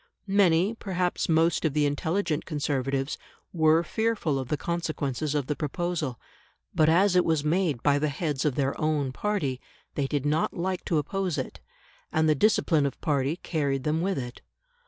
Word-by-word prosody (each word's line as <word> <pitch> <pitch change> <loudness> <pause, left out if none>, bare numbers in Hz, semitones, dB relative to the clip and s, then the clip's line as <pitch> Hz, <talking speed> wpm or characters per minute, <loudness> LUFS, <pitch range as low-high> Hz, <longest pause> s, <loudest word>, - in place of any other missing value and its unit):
Many, 195 -1 +3
perhaps 185 -6 -2
most 165 0 +3
of 155 -4 +1
the 150 -1 +3
intelligent 160 +3 -1
Conservatives, 140 -2 -2 0.3
were 160 0 +4
fearful 205 -7 0
of 130 - -4
the 150 - -1
consequences 155 -3 -2
of 145 -3 0
the 150 - -2
proposal; 155 -3 -2 0.5
but 155 0 +4
as 185 +3 +4
it 180 - +5
was 160 -3 +1
made 155 -5 0
by 145 -1 +3
the 150 +1 +1
heads 145 -1 -2
of 150 -4 +1
their 140 -1 0
own 150 -4 +1
party, 145 -7 -2 0.3
they 140 -2 -1
did 145 -1 -2
not 150 +2 +1
like 185 +1 -2
to 165 - +1
oppose 185 +2 -1
it, - - -4 0.5
and 160 0 +2
the 155 - +5
discipline 155 -4 +3
of 140 - -6
party 145 -1 0
carried 140 -5 -1
them 155 +3 0
with 190 +2 0
it. 125 -2 -6
155 Hz, 175 wpm, -27 LUFS, 140-175 Hz, 0.5 s, it